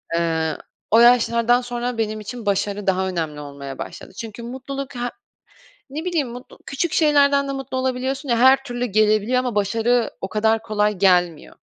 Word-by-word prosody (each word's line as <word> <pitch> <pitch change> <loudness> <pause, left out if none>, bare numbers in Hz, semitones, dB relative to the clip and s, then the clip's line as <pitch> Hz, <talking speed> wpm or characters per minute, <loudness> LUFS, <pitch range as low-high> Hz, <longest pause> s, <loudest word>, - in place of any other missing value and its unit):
Eee, 160 -1 0 0.3
o 225 - +6
yaşlardan 240 0 +4
sonra 245 0 -4
benim 215 -1 -2
için 225 +2 -8
başarı 200 0 -1
daha 190 0 +1
önemli 160 -4 -3
olmaya 140 -2 -8
başladı. - - -8
Çünkü 225 +1 -8
mutluluk 265 +2 -6
he 245 - -6 0.9
ne 310 +6 -6
bileyim 325 -7 0
mutlu 245 +2 -11
küçük 305 +4 -2
şeylerden 285 -2 +3
de - - -2
mutlu 270 -1 -5
olabiliyorsun 260 +2 -2
ya 235 - +2
her 265 +2 +6
türlü 245 -2 -3
gelebiliyor 215 +2 +2
ama 250 -4 -3
başarı 225 +3 +1
o 190 - -4
kadar 220 +1 +1
kolay 210 -2 0
gelmiyor. 180 -4 +2
235 Hz, 165 wpm, -21 LUFS, 205-260 Hz, 0.9 s, o